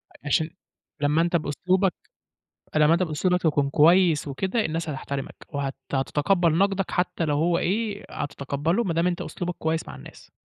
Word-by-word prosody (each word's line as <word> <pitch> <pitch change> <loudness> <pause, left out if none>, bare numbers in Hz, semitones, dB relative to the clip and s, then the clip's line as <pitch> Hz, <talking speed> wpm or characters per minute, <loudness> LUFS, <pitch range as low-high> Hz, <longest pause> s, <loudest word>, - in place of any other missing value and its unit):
أ - - -14
عشان 160 +2 +2 0.5
لمّا 150 +3 +3
أنت 170 +1 +1
بأسلوبك 180 +5 +1 0.8
فلمّا 155 +1 +4
أنت 180 - +1
بأسلوبك 180 +3 0
تكون 145 -3 +2
كويس 165 -1 +4
وكده، 190 - -1
الناس 165 0 -2
هتحترمك 140 -1 -5
وهت 140 -2 -3 0.2
هتتقبَّل 160 +5 +2
نَقدَك 195 -1 +1
حتّى 180 -2 -1
لو 145 -2 0
هو 170 +3 +2
إيه 205 +2 -1
هتتقبَّله 145 - -2
ما 170 -4 -1
دام 170 +2 +2
أنت 180 0 -1
أسلوبك 175 -1 -4
كويس 160 0 -1
مع - - -8
الناس. - - -14
165 Hz, 160 wpm, -25 LUFS, 150-180 Hz, 0.8 s, فلمّا